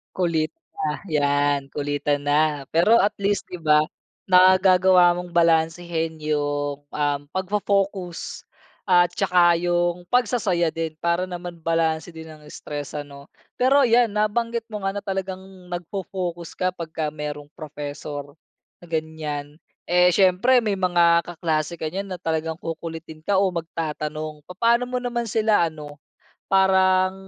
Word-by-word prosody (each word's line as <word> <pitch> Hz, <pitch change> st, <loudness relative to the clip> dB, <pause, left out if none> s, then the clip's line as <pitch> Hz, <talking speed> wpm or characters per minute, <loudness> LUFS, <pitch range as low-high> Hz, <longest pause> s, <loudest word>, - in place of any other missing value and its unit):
Kulitta 165 Hz, -, -2 dB, 0.2 s
'yan 145 Hz, -2 st, +1 dB
kulitan 145 Hz, 0 st, -1 dB
na. 145 Hz, -1 st, +1 dB
Pero 195 Hz, +8 st, +4 dB
at 210 Hz, +1 st, +2 dB
least, 200 Hz, 0 st, -1 dB
'di 180 Hz, -, -8 dB
ba, 150 Hz, -1 st, +5 dB, 0.5 s
nagagawa 185 Hz, -1 st, +6 dB
mong 180 Hz, 0 st, -6 dB
balansehin 165 Hz, -1 st, +1 dB
yung, 145 Hz, -1 st, -2 dB
um, 145 Hz, -1 st, -1 dB
pagfo-focus 195 Hz, -2 st, -2 dB, 0.4 s
at 175 Hz, -1 st, +5 dB
tsaka 175 Hz, -3 st, +3 dB
yung 175 Hz, 0 st, 0 dB
pagsasaya 215 Hz, -9 st, +1 dB
din. 160 Hz, -1 st, -4 dB
Para 170 Hz, +1 st, +1 dB
naman 175 Hz, -1 st, -7 dB
balanse 165 Hz, 0 st, 0 dB
din 160 Hz, -1 st, -10 dB
ang 155 Hz, -1 st, -13 dB
stress 145 Hz, -1 st, -7 dB
ano? 140 Hz, -1 st, -8 dB, 0.3 s
Pero 275 Hz, +3 st, +5 dB
yan 240 Hz, -1 st, +4 dB
nabanggit 230 Hz, +2 st, 0 dB
mo 210 Hz, -2 st, -5 dB
nga 195 Hz, +1 st, -1 dB
na 205 Hz, -, -4 dB
talagang 190 Hz, -1 st, -3 dB, 0.3 s
nagfo-focus 175 Hz, -1 st, -5 dB
kapag 180 Hz, -3 st, -2 dB
ka 155 Hz, -1 st, -2 dB
merong 150 Hz, -1 st, -6 dB
professor 145 Hz, -1 st, -7 dB, 0.4 s
na 175 Hz, -, -14 dB
ganyan, 155 Hz, -2 st, -4 dB, 0.3 s
eh, 180 Hz, +1 st, +5 dB
siyempre 200 Hz, +7 st, +4 dB
may 210 Hz, -2 st, 0 dB
mga 170 Hz, -2 st, +4 dB
kaklase 165 Hz, -1 st, -2 dB
ka 160 Hz, -2 st, -4 dB
niyan 195 Hz, +3 st, -4 dB
na 185 Hz, -, -4 dB
talagang 160 Hz, -1 st, -2 dB
kukulitin 165 Hz, -1 st, -7 dB
ka 200 Hz, -, +1 dB
o 195 Hz, -2 st, +2 dB
magtatanong 155 Hz, -2 st, -4 dB
papaano 235 Hz, +6 st, +1 dB
mo 250 Hz, -, -2 dB
naman 240 Hz, -1 st, -2 dB
sila 215 Hz, -5 st, +2 dB
ano 150 Hz, -2 st, -10 dB, 0.5 s
parang, 190 Hz, -1 st, +4 dB
170 Hz, 130 wpm, -23 LUFS, 155-190 Hz, 0.5 s, nagagawa